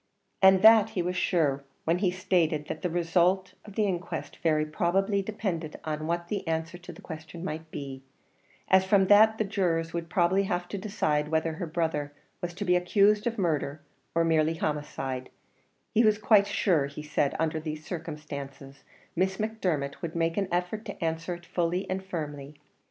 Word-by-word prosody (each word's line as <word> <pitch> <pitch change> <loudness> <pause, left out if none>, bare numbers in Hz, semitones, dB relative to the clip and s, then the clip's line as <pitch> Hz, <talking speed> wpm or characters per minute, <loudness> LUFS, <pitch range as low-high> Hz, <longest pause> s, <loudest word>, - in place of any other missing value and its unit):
And 190 0 +6
that 220 -1 +8
he 180 - +2
was 180 +1 -2
sure 150 -7 +1 0.2
when 170 +2 +2
he 190 -2 +2
stated 170 -4 +1
that 155 - -6
the 180 - -1
result 175 +2 +1
of 205 -2 -12
the 215 - +2
inquest 180 -3 -4
very 155 -2 +1
probably 195 +6 +1
depended 190 -6 -4
on 155 0 -3
what 170 +1 -1
the 200 -2 -3
answer 165 +2 -2
to 180 - -10
the - - -14
question 160 +1 -8
might 160 -2 -5
be, 135 -3 -7 0.7
as 190 0 +5
from 190 0 +4
that 220 +2 +7
the 220 - +1
jurors 170 -5 -1
would 170 -1 -4
probably 180 +2 +3
have 175 -2 -2
to 200 - -4
decide 155 -8 0
whether 160 +1 0
her 170 +2 -5
brother 155 -3 -2 0.3
was 175 0 -4
to 205 +2 -4
be 180 -1 +4
accused 205 +4 +3
of 235 0 -2
murder, 155 -5 -1 0.4
or 165 - +4
merely 160 0 +2
homicide, 135 -4 -3 0.6
he 230 - +4
was 215 -1 +4
quite 210 -1 +4
sure, 160 -8 +2
he 145 +2 -8
said, 150 -2 0
under 160 -1 0
these 155 -1 -6
circumstances, 140 -4 -7 0.3
Miss 190 +2 +1
Macdermot 180 -11 -2
would 170 -2 -5
make 165 0 0
an 200 -2 0
effort 180 +5 -1
to 170 - -5
answer 165 +2 -2
it 175 0 -14
fully 175 +2 -1
and 190 0 -3
firmly. 150 -5 -6
170 Hz, 180 wpm, -28 LUFS, 155-190 Hz, 0.7 s, that